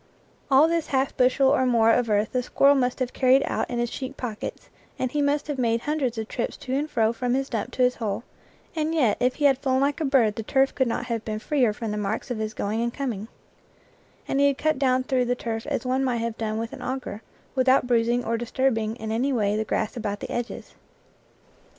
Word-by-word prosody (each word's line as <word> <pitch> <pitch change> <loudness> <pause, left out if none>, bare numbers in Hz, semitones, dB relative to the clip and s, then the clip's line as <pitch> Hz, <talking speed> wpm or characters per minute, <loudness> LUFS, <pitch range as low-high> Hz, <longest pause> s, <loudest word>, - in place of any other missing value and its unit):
All 275 +3 +6
this 335 -1 0
half 265 0 0
bushel 260 +1 +4
or 270 -1 +3
more 230 -3 +4
of 235 0 +2
earth 210 +1 +1
the 250 - 0
squir 275 +2 +3
rel 285 - +6
must 250 -2 +1
have 255 -2 -2
carried 260 +1 +4
out - - -2
in 245 - -3
his 240 0 -1
cheek 270 +1 -6
pockets, 225 -4 -6 0.3
and 255 -1 -2
he 295 - 0
must 285 +1 +1
have 290 -3 -4
made 230 -1 +1
hundreds 275 -6 -1
of 220 -1 -3
trips 240 - -3
to 260 - -5
and 290 +3 -1
fro 225 -4 +2
from 245 +1 -1
his 270 0 -1
dump 225 0 -2
to 255 - +1
his 250 0 +2
hole, 220 -1 -3 0.5
and 315 +1 -1
yet 245 -10 +3
if 250 +1 +1
he 295 - 0
had 270 -2 +4
flown 260 -1 +1
like 285 +3 0
a - - +1
bird 245 -6 +3
the - - -2
turf 270 +4 +2
could 260 -2 +1
not 235 - -2
have 230 -2 -3
been 215 -1 -3
freer 245 +1 +1
from 220 +1 -5
the 210 - -3
marks 210 +4 -3
of 235 - -2
his 215 0 -3
going 215 +3 -1
and 235 0 -2
coming; 230 -7 -3 1.0
and 275 - 0
he 280 - +5
had 280 -1 +1
cut 310 -2 0
down 260 -2 +2
through 255 -1 +1
the 245 +1 0
turf 225 -1 -4
as 285 -2 -2
one 260 +1 +1
might 250 -3 0
have 230 -1 -2
done 220 -1 -3
with 225 0 -4
an - - -8
au 260 +1 -2
ger, 235 -4 -8 0.3
without 260 -1 +3
bruising 240 0 +1
or 230 +1 0
disturbing 230 -2 0
in 220 -2 -5
any 250 +5 0
way 210 -5 +1
the 215 - 0
grass 220 +2 -1
about 205 -3 -3
the - - -6
edges. 240 0 -5
250 Hz, 245 wpm, -25 LUFS, 225-270 Hz, 1.0 s, All